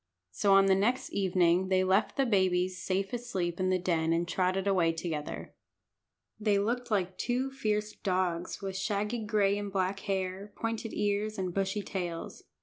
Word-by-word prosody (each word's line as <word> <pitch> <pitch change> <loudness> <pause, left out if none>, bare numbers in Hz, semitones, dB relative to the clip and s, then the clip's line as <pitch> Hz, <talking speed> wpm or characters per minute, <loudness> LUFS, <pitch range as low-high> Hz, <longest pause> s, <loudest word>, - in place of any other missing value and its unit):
So 200 -2 +3
on 195 0 +6
the 195 - +5
next 220 +7 +1
evening 185 -1 +2
they 185 0 +3
left 190 +2 +2
the 275 - +3
babies 185 -4 +1
safe 195 +3 -1
asleep 190 -8 -2
in 185 0 +1
the 185 - +3
den 165 -3 +1
and 170 +1 0
trotted 185 +2 0
away 180 -4 +3
together. 160 -3 -5 0.9
They 210 -2 +2
looked 240 +5 -1
like 190 -3 -1
two 255 +2 0
fierce 215 -5 -1
dogs, 185 -1 -2
with 195 -1 -3
shaggy 210 +3 -1
gray 205 -2 +2
and 205 -1 -5
black 190 0 0
hair, 195 +1 -3
pointed 225 0 -3
ears, 210 +1 0
and 185 -2 -2
bushy 195 +2 -1
tails. 175 -4 -5
195 Hz, 165 wpm, -30 LUFS, 185-210 Hz, 0.9 s, on